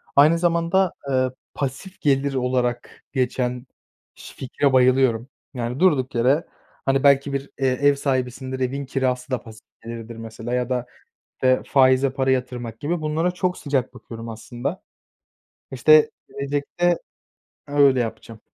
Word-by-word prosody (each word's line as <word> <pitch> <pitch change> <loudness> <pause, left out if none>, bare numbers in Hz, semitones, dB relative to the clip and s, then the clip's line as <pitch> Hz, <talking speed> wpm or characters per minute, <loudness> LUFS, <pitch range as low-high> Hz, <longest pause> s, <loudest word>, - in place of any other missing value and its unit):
Aynı 155 +4 +6
zamanda, 170 +2 +2 0.2
eee, 130 -1 +2 0.2
pasif 145 +9 -5
gelir 140 -1 +2
olarak 125 -2 -1
geçen 125 -1 -1 0.5
şi - - -12
fikre 135 +1 0
bayılıyorum. 130 -2 +3 0.3
Yani, 125 0 -3
durduk 145 -8 +2
yere, 130 +7 +2 0.4
hani, 135 0 +2
belki 140 0 +4
bir, 140 0 -3
eee, 135 - +2
ev 140 +3 +3
sahibisindir, 130 -1 -2
evin 135 +2 -2
kirası 130 -1 -1
da 125 -4 -1
pasif 110 -1 -13 0.2
gelirdir, 115 0 -7
mesela 115 +1 -6
ya 125 0 0
da, 125 -1 -1 0.6
eee, 130 0 +4
faize 130 0 +4
para 135 0 0
yatırmak 125 -3 -2
gibi, 165 +3 -1
bunlara 155 +3 0
çok 180 0 -2
sıcak 135 -4 -1
bakıyorum 115 -2 -9
aslında. 115 +2 -5 0.9
İşte, 155 +4 +5 0.2
gelecekte 145 +5 -1 0.7
öyle 140 -2 +4
yapacağım. 115 -1 -5
130 Hz, 135 wpm, -23 LUFS, 125-145 Hz, 0.9 s, Aynı